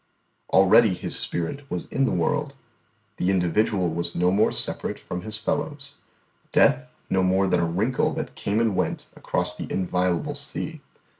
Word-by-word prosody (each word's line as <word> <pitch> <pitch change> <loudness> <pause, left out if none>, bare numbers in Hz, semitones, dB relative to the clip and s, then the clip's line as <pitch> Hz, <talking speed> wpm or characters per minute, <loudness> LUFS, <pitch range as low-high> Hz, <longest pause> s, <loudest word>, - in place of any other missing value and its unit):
Already 95 +2 +6
His - - -4
spirit 135 +12 -3
was 90 - -3
in 135 - +1
the - - 0
world; 140 - 0 0.6
the 90 - 0
individual 95 +1 +1
was 85 +1 -3
no 90 +1 +2
more 105 +3 +3
separate - - 0
from 90 - -6
his 110 +3 -2
fellows; 145 +4 -3 0.6
death 70 0 +3 0.2
no 95 - +1
more 95 +1 +2
than 90 -2 +2
a 85 - +2
wrinkle 110 +9 +1
that - - -4
came 100 +2 -1
and 115 -4 +1
went - - -1
across - - -1
the - - -7
inviolable 90 - 0
sea. 150 +2 -6
95 Hz, 160 wpm, -24 LUFS, 90-130 Hz, 0.6 s, Already